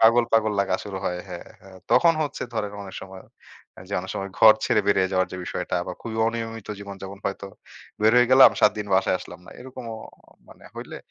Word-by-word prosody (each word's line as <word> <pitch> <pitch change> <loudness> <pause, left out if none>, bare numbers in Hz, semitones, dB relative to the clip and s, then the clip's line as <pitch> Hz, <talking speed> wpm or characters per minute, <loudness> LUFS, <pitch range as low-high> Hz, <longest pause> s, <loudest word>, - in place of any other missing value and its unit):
পাগল, 115 +1 +6
পাগল 110 -1 +3
লাগা 100 - 0
শুরু 100 -2 -6
হয়। 90 0 -2
হ্যাঁ, 90 -1 -8
হ্যাঁ, 95 -1 -15
তখন 170 -1 +6
হচ্ছে 145 -2 -4
ধরেন 105 -2 -2
অনেক 95 - -10
সময় 95 0 -11 0.7
যে 100 - -4
অনেক 95 +1 -8
সময় 95 0 -4
ঘর 110 -1 +8
ছেড়ে 105 - +2
বেরিয়ে 95 -2 +3
যাওয়ার 95 0 +1
যে - - -5
বিষয়টা, - - -3
বা - - -3
খুবই 110 -1 -6
অনিয়মিত 115 -1 -4
জীবনযাপন, 100 -1 -9
হয়তো 100 0 -4 0.6
বের 110 +1 +5
হয়ে 125 0 +5
গেলাম, 130 +1 +9
৭ 105 - +5
দিন 105 - -4
বাসায় 95 -1 +2
আসলাম 90 0 -11
না। - - -12
এরকমও 125 -3 -8 0.5
মানে, - - -17
হইলে - - -8
105 Hz, 200 wpm, -24 LUFS, 95-115 Hz, 0.7 s, গেলাম